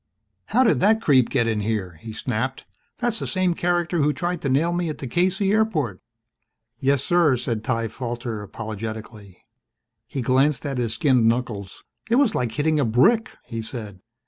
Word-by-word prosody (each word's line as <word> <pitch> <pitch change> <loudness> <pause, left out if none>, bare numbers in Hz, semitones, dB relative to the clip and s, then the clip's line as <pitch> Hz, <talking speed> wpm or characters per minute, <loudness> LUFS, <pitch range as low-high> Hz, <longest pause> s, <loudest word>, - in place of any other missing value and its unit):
"How 250 +4 +3
did 235 - +3
that 215 +3 +4
creep 135 - +4
get 125 -4 +1
in 110 -2 0
here?" 100 -5 -2
he 115 - -7
snapped. 125 +3 -3 0.3
"That's 235 -2 -1
the - - -3
same 185 -2 +1
character 175 0 0
who 150 0 +3
tried 175 0 -2
to 140 - -1
nail 155 +6 +2
me 175 -1 -1
at 155 - -4
the - - -6
K.C. 185 - +1
airport." 165 - 0 0.8
"Yes, 140 0 +2
sir," 170 -6 +3
said 115 -2 -3
Ty 115 -1 -1
Falter 120 -2 -5
apologetically. 110 -1 -7 0.6
He 130 0 -4
glanced 130 +3 +2
at 135 -3 -2
his 115 -2 -1
skinned 125 -5 +3
knuckles. 115 -5 -2 0.3
"It 230 - +3
was 255 -5 +4
like 120 -3 -1
hitting 155 +4 +1
a - - +3
brick," 175 - +3
he 115 -2 -5
said. 110 -4 -7
130 Hz, 175 wpm, -23 LUFS, 115-175 Hz, 0.8 s, that